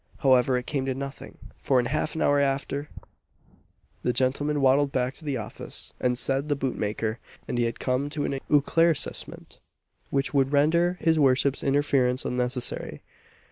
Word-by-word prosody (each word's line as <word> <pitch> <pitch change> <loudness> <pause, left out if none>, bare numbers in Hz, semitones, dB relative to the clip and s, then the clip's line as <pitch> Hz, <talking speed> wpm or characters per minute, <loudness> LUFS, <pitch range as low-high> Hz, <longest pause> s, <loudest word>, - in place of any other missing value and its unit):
However, 130 -2 +3
it 125 - -4
came 135 -3 -2
to 130 - -1
nothing; 140 +1 -7 0.2
for 130 -2 +2
in 120 - 0
half 155 +4 -1
an - - 0
hour 145 0 +3
after, 140 +1 -1 1.1
the 125 - +1
gentleman 135 +4 0
waddled 135 +1 +3
back 130 0 -1
to 160 - -9
the 145 -3 -2
office, 110 - -5
and 125 -1 +1
said 135 +3 0
the 145 - +2
boot 135 -2 -2
maker 110 +2 -2 0.3
and 120 - -2
he 120 - +2
had 115 0 -3
come 130 +3 -1
to 145 -1 -3
an 135 - -2
éclaircissement 160 +2 0 0.5
which 135 +1 -1
would 135 -1 +2
render 170 +5 +3
his 160 -1 +3
worship's 135 0 +3
interference 135 -2 +1
unnecessary. 125 0 -2
135 Hz, 165 wpm, -26 LUFS, 125-145 Hz, 1.1 s, However